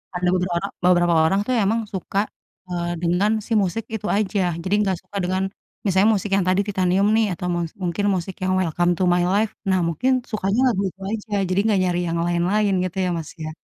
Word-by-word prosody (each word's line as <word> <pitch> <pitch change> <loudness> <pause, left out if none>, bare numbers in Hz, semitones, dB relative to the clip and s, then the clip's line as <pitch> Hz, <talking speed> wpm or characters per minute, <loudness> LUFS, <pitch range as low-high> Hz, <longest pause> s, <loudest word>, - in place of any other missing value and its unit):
ada 180 0 0
beberoro 180 +1 0 0.2
beberapa 175 -1 +4
orang, 195 +5 +2
tuh, 255 - +1
emang 225 +4 +1
suka, 195 +1 -2 0.5
eee, 175 -1 -2
dengan 180 +5 +2 0.2
si 230 - -1
musik 200 +4 -2
itu 210 -1 -4
aja. 205 -1 0 0.2
Jadi 185 - -2
gak 190 - 0
suka 200 +2 -8
dengan 185 +1 0 0.4
misalnya 195 +2 +4
musik 205 +1 -3
yang 195 - +1
tadi 185 +2 +3
Titanium, 190 0 +2
nih, 225 0 +3
atau 180 +1 -5
mus 170 -2 -2
mungkin 180 +3 -1
musik 185 +1 -4
yang 185 0 +1
Welcome 175 0 +1
to 185 - +2
My 175 0 +3
Life. 205 +3 +1 0.2
Nah, 185 - +3
mungkin 250 +11 0 0.2
sukanya 205 0 0
lagu 195 -4 -1
itu 190 - -21
aja, 220 -1 -5 0.2
jadi 185 +1 +1
gak 200 - +3
nyari 175 -1 0
yang 165 0 -1
lain-lain 185 +4 +1
gitu, 185 0 -4
ya, - - 0
Mas, 160 -2 -6
ya? 155 - -4
185 Hz, 205 wpm, -22 LUFS, 175-200 Hz, 0.5 s, beberapa